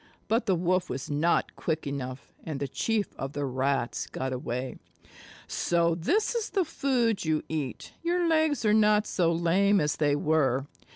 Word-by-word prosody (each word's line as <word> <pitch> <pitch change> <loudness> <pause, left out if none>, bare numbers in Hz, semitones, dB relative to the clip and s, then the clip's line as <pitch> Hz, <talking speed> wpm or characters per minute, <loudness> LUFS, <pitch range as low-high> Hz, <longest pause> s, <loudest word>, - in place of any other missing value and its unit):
But 230 +1 +1
the 190 - +3
Wolf 180 +1 +1
was 130 +3 -4
not 160 +4 +1
quick 160 -1 -2
enough, 135 -1 -5
and 155 -4 -4
the 140 - -2
Chief 215 - -1
of 135 +1 -5
the 145 -1 -2
Rats 130 -1 -1
got 130 0 -3
away. 125 +1 -4 0.7
"So 170 -1 +1
this 365 - +1
is 460 -2 -2
the 385 -3 +1
food 255 -8 0
you 155 -1 0
eat. 150 -5 -4
Your 345 +1 +1
legs 315 -5 +2
are 210 - +4
not 210 0 +4
so 170 -3 +1
lame 185 +5 +3
as 150 -1 0
they 145 -2 +2
were. 145 -3 +1
165 Hz, 170 wpm, -28 LUFS, 140-215 Hz, 0.7 s, are